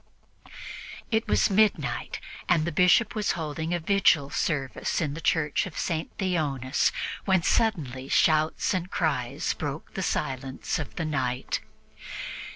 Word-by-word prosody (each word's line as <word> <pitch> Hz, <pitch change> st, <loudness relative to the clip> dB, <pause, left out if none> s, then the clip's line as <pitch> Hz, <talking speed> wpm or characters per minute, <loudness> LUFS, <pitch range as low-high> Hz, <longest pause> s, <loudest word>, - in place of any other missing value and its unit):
It 220 Hz, 0 st, +1 dB
was 210 Hz, -, +3 dB
midnight, 190 Hz, -, +1 dB, 0.3 s
and 165 Hz, -3 st, +4 dB
the 170 Hz, -, -1 dB
Bishop 180 Hz, +7 st, +4 dB
was 210 Hz, -2 st, 0 dB
holding 160 Hz, 0 st, -3 dB
a 175 Hz, -, +1 dB
vigil 165 Hz, -6 st, +3 dB
service 135 Hz, -5 st, -1 dB
in 150 Hz, -4 st, -1 dB
the 165 Hz, -, -6 dB
Church 155 Hz, +2 st, +1 dB
of 180 Hz, -, -10 dB
St. 160 Hz, -2 st, -1 dB
Theonas, 150 Hz, -8 st, +1 dB, 0.3 s
when 190 Hz, -3 st, +3 dB
suddenly 140 Hz, -, +1 dB
shouts 155 Hz, +3 st, +3 dB
and 180 Hz, -1 st, -2 dB
cries 140 Hz, -5 st, -1 dB
broke 145 Hz, 0 st, -5 dB
the 190 Hz, -, -3 dB
silence 135 Hz, -6 st, -2 dB
of 115 Hz, -9 st, -6 dB
the 160 Hz, -, -2 dB
night. 130 Hz, -4 st, -1 dB
160 Hz, 135 wpm, -27 LUFS, 135-180 Hz, 0.3 s, and